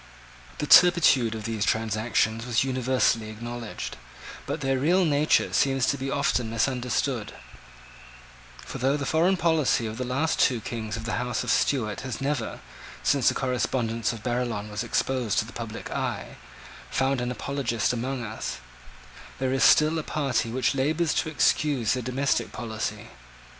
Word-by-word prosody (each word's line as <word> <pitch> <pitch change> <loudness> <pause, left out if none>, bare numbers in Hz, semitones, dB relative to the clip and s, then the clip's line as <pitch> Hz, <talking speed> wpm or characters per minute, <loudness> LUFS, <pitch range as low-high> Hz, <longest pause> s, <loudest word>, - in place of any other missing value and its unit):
The 150 - -2
turpitude 145 -10 +6
of 110 - -6
these 110 -2 -2
transactions 110 +1 0
is 120 0 +2
universally 130 -4 +1
acknowledged: 115 +1 -6 0.5
but 145 +2 -3
their 135 -1 0
real 175 +6 +3
nature 150 0 +2
seems 135 -2 +2
to - - +1
be 135 +1 -3
often 125 -4 0
misunderstood: 125 0 -1 1.3
for - - -7
though 135 +3 +2
the 140 - -3
foreign 175 +6 +2
policy 160 -8 +2
of 110 +2 -5
the - - -1
last 135 +6 -1
two 125 -4 +3
Kings 110 0 -5
of 115 - -6
the 110 0 -2
House 125 0 -2
of - - -1
Stuart 110 -8 +1
has 130 -3 -5
never, 135 -4 -2 0.4
since 140 -4 +2
the - - +4
correspondence 120 -3 -1
of 115 -3 -8
Barillon 120 -4 -2
was 105 +2 -3
exposed 120 -1 -1
to - - +2
the - - -12
public - - -7
eye, - - -3 0.5
found 135 -1 0
an 125 - -2
apologist 125 -3 -1
among 125 +1 -3
us, 110 -1 -5 0.8
there 130 0 -1
is 135 - +2
still 155 +1 +5
a - - -1
party 135 -7 -1
which 125 +2 0
labours 155 +5 +1
to - - 0
excuse 145 -6 +2
their 125 - -2
domestic 130 +3 -1
policy. 110 - -5
125 Hz, 160 wpm, -26 LUFS, 115-140 Hz, 1.3 s, turpitude